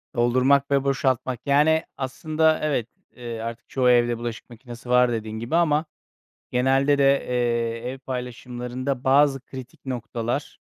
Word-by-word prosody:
Doldurmak 130 +4 +3
ve 140 -1 +3
boşaltmak. 130 -2 0
Yani, 150 +3 +3
aslında, 155 +4 +1
evet, 140 -7 0 0.3
ııı, 120 -2 -6
artık 115 0 -7
çoğu 130 -2 +2
evde 120 -1 +3
bulaşık 120 -1 -6
makinesi 120 +1 -11
var 125 0 +4
dediğin 110 -1 -4
gibi 120 +8 -2
ama 160 -2 +2 0.7
genelde 135 +3 +2
de, 140 0 +4
ııı, 120 -1 -1
ev 135 - -9
paylaşımlarında 125 0 -5
bazı 135 0 +4
kritik 130 0 -11
noktalar, 120 -2 -4
125 Hz, 135 wpm, -24 LUFS, 120-140 Hz, 0.7 s, var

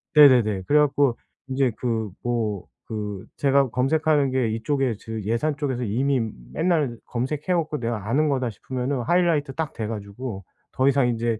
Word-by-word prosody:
네네네 120 -10 +6
그래 150 +1 +5
갖고 140 -4 +2 0.3
인제 130 -2 +1
그 115 -4 -2
뭐 110 -5 -1 0.2
그 105 -3 -5
제가 140 -2 +3
검색하는 145 +2 +2
게 130 -3 +1
이쪽에 125 +3 0
그 110 -2 -5
예산 130 +8 0
쪽에서 130 -5 -2
이미 130 +5 +1 0.3
맨날 155 -9 +1
검색해 130 +5 -3
갖고 160 -3 0
'내가 115 -3 -3
아는 150 +5 +2
거다.' 130 -4 0
싶으면은 130 +3 -3
하이라이트 160 -2 +2
딱 160 -1 -3
돼 110 -2 -4
가지고 100 -1 -6 0.3
더 130 +1 +1
이상 135 -2 +4
인제 115 -1 -1
130 Hz, 325 characters per minute, -24 LUFS, 115-145 Hz, 0.3 s, 네네네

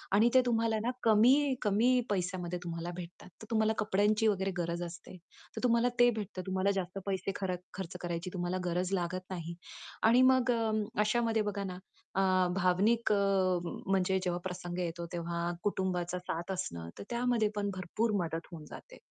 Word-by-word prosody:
आणि 225 +3 +5
ते 260 - +7
तुम्हाला 225 -2 +2
ना 245 - +1
कमी 255 +6 +5
कमी 230 +5 +3
पैशामध्ये 180 -2 -2
तुम्हाला 170 0 -4
भेटतात. 175 +1 -9
तर - - -8
तुम्हाला 220 0 +3
कपड्यांची 210 +1 +2
वगैरे 195 -2 +1
गरज 170 0 -2
असते. 175 +2 -9 0.4
तर - - -5
तुम्हाला 235 +1 +4
ते 245 0 +7
भेटतं, 205 -4 -5
तुम्हाला 190 +1 +1
जास्त 185 +2 -5
पैसे 195 0 -1
खरक 185 -2 -2
खर्च 185 -1 -6
करायची 175 +1 -3
तुम्हाला 175 +1 -1
गरज 180 +2 -1
लागत 185 +1 -2
नाही 170 -1 -5 0.5
आणि 235 +3 +6
मग 255 -1 +3
अं, 220 -2 +1 0.2
अशामध्ये 225 0 +2
बघा 200 0 -4
ना, 180 -1 -5 0.4
अ, 185 -1 +3
भावनिक 200 +5 +2
अ, - - +4 0.5
म्हणजे 190 +1 0
जेव्हा 175 -1 -1
प्रसंग 180 -1 -5
येतो, 170 -1 -3
तेव्हा 170 0 -2
कुटुंबाचा 180 -3 -1
साथ 175 +1 -4
असणं 85 - -4
तर - - -5
त्यामध्ये 235 -3 +2
पण 205 -1 -1
भरपूर 210 +5 -1
मदत 165 0 -4
होऊन 155 -3 -9
जाते. - - -11
190 Hz, 165 wpm, -32 LUFS, 175-220 Hz, 0.5 s, ते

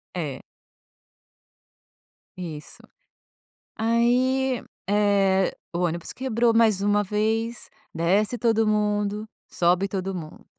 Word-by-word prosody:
É 150 -7 -4 2.0
Isso. 160 -4 -7 0.9
Aí, 245 +3 +2 0.3
eh, 200 -2 +2 0.2
o 170 - -2
ônibus 170 -1 -1
quebrou 240 -2 +1
mais 220 -4 +4
uma 205 +1 +3
vez, 220 +3 -1 0.3
desce 200 +8 +1
todo 225 -1 +2
mundo, 210 0 0 0.2
sobe 180 +3 +2
todo 195 0 -3
mundo. 160 -3 -8
210 Hz, 90 wpm, -25 LUFS, 185-225 Hz, 2.0 s, mais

